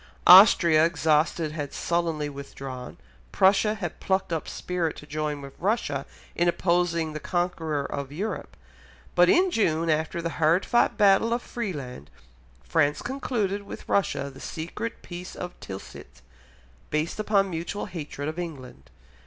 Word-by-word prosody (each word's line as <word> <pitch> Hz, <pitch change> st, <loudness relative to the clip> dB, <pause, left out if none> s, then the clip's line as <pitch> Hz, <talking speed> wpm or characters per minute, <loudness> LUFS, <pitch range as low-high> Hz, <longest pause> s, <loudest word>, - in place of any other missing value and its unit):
Austria, 175 Hz, -4 st, +8 dB
exhausted, 160 Hz, -1 st, +1 dB
had 145 Hz, -3 st, -5 dB
sullenly 165 Hz, -3 st, -1 dB
withdrawn, 135 Hz, -2 st, -8 dB, 0.3 s
Prussia 205 Hz, +3 st, +3 dB
had 180 Hz, -6 st, -5 dB
plucked 190 Hz, -2 st, 0 dB
up 160 Hz, -, -3 dB
spirit 175 Hz, -3 st, -2 dB
to -, -, -11 dB
join 150 Hz, -1 st, -3 dB
with 135 Hz, 0 st, -9 dB
Russia 170 Hz, -, -1 dB, 0.3 s
in 175 Hz, -, +2 dB
opposing 170 Hz, -2 st, +1 dB
the 155 Hz, -, -4 dB
conqueror 160 Hz, -5 st, -2 dB
of 140 Hz, -1 st, -5 dB
Europe, 200 Hz, +9 st, -5 dB, 0.6 s
but -, -, +5 dB
in 370 Hz, 0 st, +4 dB
June, 165 Hz, -, +1 dB
after 155 Hz, +2 st, -1 dB
the 165 Hz, 0 st, -3 dB
hard 165 Hz, +5 st, +3 dB
fought 240 Hz, -, +2 dB
battle 210 Hz, +2 st, +4 dB
of 240 Hz, -, -2 dB
Frieland, 140 Hz, -, -6 dB, 0.5 s
France 145 Hz, -, +1 dB
concluded 230 Hz, -7 st, -2 dB
with 200 Hz, -, -10 dB
Russia 140 Hz, -8 st, 0 dB
the 135 Hz, -, -14 dB
secret 170 Hz, +11 st, -6 dB
Peace 175 Hz, 0 st, -8 dB
of 180 Hz, -, -6 dB
Tilsit, 95 Hz, -8 st, -10 dB, 0.7 s
based 155 Hz, +6 st, -2 dB
upon 200 Hz, -2 st, +2 dB
mutual 170 Hz, +5 st, -4 dB
hatred 155 Hz, -6 st, -6 dB
of 155 Hz, +3 st, -4 dB
England. 130 Hz, -, -8 dB
165 Hz, 140 wpm, -26 LUFS, 150-195 Hz, 0.7 s, Austria